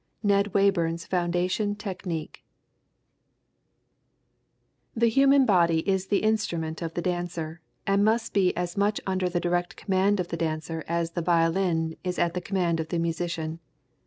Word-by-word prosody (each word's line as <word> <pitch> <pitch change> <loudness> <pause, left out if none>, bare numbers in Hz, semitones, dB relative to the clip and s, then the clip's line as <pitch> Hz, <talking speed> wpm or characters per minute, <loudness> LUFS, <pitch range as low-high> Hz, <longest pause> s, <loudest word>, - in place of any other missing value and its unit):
NED 200 -1 +2
WAYBURN'S 170 -4 +2
FOUNDATION 180 +3 0
TECHNIQUE 185 -6 -5 2.5
The 230 0 +3
human 275 +3 +5
body 170 -5 +3
is 190 -1 +1
the 200 +1 +1
instrument 170 -8 -1
of 165 -1 -4
the 175 - -2
dancer, 175 -2 -3 0.2
and 200 +1 +3
must 225 +2 +1
be 190 -3 +3
as 175 0 -2
much 205 +1 +1
under 185 -1 0
the 175 0 -1
direct 175 0 -1
command 195 +1 +1
of 180 - -2
the 170 - -3
dancer 160 0 -3
as 170 0 -1
the 170 - -2
violin 165 -1 +1
is 180 -1 -2
at 170 -1 +1
the 180 - -3
command 175 -4 0
of 160 - -2
the 175 - -2
musician. 165 -1 -2
175 Hz, 150 wpm, -26 LUFS, 165-195 Hz, 2.5 s, human